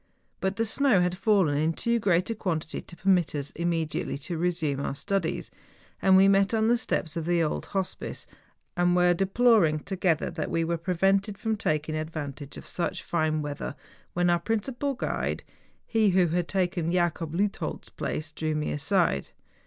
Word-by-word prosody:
But 190 0 -1
the 225 - 0
snow 245 -1 +3
had 180 0 +1
fallen 195 -6 +3
in 160 +2 +1
too 235 +6 +1
great 185 -1 +2
a - - -2
quantity 165 -6 -3
to 170 - -10
permit 180 -4 +2
us 145 0 -3
immediately 165 -4 -2
to 160 +5 -4
resume 165 -4 0
our 140 - -2
studies, 175 +3 -2 0.5
and 190 -1 +6
we 195 +1 +7
met 195 +2 +3
on 220 0 +2
the 240 - +4
steps 160 -9 -2
of 165 -1 -3
the 175 -1 +3
old 155 - -2
hospice, 190 -2 -4 0.5
and 175 0 +3
were 180 0 +5
deploring 195 -3 +3
together 180 -4 0
that 165 -2 -3
we 165 - 0
were 170 0 -1
prevented 195 +4 +1
from 220 +1 -1
taking 155 -5 -1
ad¬ 155 0 -3
vantage 145 -3 -6
of - - -9
such 175 - -3
fine 155 -2 0
weather, 145 -1 -5 0.4
when 175 0 +2
our 175 - +3
principal 240 +8 -1
guide, - - -2 0.4
he 220 -3 +3
who 180 -2 +3
had 175 +1 0
taken 180 -3 0
Jacob 170 -2 0
Leuthold's 200 +3 -2
place, 155 0 -4
drew 155 0 -2
me 150 0 -1
aside. 160 - +1
175 Hz, 175 wpm, -27 LUFS, 160-195 Hz, 0.5 s, we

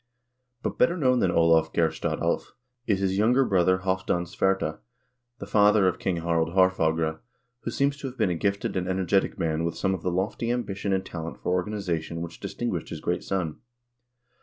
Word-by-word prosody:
But - - -3
better 170 +8 +3
known 130 -5 +3
than 95 - +2
Olav 80 -1 +3
Geirstad 80 -2 0
Alv - - -1 0.3
is 100 -3 +1
his 95 0 +1
younger 125 +5 +4
brother 95 -3 +2
Halvdan 95 -2 0
Svarte, 95 +3 0 0.6
the - - -7
father 105 -1 +4
of 90 0 0
King 90 -3 -1
Harald 85 0 0
Haarf 95 0 +4
agre, 80 0 0 0.4
who - - -5
seems 140 +4 0
to 140 - -5
have 130 0 -9
been 90 - +2
a - - 0
gifted 100 +4 -1
and 90 -1 -1
energetic 95 +1 +1
man 80 0 -1
with 85 0 -2
some 95 -1 +1
of 95 - -4
the 90 - -1
lofty 95 +6 -1
ambition 105 -5 -2
and 95 0 0
talent 80 -5 -6
for 65 +8 -2
organization 90 -4 -2
which 85 -1 -7
distinguished - - -3
his - - -6
great - - -2
son. 90 -6 -2
95 Hz, 185 wpm, -26 LUFS, 85-100 Hz, 0.6 s, younger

